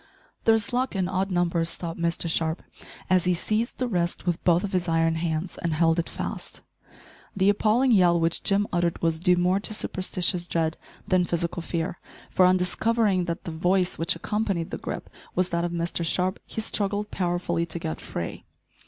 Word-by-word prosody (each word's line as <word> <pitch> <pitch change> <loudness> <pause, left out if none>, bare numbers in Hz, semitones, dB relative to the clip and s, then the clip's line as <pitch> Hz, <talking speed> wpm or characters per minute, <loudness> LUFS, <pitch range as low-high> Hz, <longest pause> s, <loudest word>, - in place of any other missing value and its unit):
"There's 225 0 +3
luck 255 -2 0
in 185 -2 +1
odd 190 +1 -1
numbers," 170 -2 +1
thought 170 -1 -5
Mr 170 0 0
Sharp, 160 0 0 0.4
as 185 -1 +3
he 180 0 +3
seized 215 +6 -1
the 255 - -1
wrist 175 -6 -1
with 175 -2 -1
both 175 0 +4
of 200 - -3
his 180 -2 0
iron 165 0 +3
hands, 165 +1 -2
and 170 -2 -1
held 165 +1 +3
it 170 - -2
fast. - - -5 0.8
The 195 +1 +4
appalling 220 +5 +3
yell 175 -5 +5
which 165 0 0
Jim 200 +1 +2
uttered 175 -1 +1
was 165 -1 +1
due 180 +1 +4
more 180 +2 +2
to 215 +1 -3
superstitious 180 -3 -1
dread 165 -1 0 0.3
than 185 -3 +3
physical 170 0 -2
fear, 170 +1 -3 0.3
for, 185 - +5
on 185 0 +4
discovering 195 +1 +1
that 170 -1 -4
the 170 - -5
voice 180 +3 +1
which 165 +1 +2
accompanied 195 -2 -2
the - - -4
grip - - -5 0.3
was 185 0 +1
that 170 0 0
of 175 - -1
Mr 170 0 -2
Sharp, 185 +3 0
he 220 - -4
struggled 205 -1 -2
powerfully 175 -2 -1
to 170 - -4
get 160 -1 -4
free. 85 - -5
175 Hz, 190 wpm, -26 LUFS, 170-190 Hz, 0.8 s, yell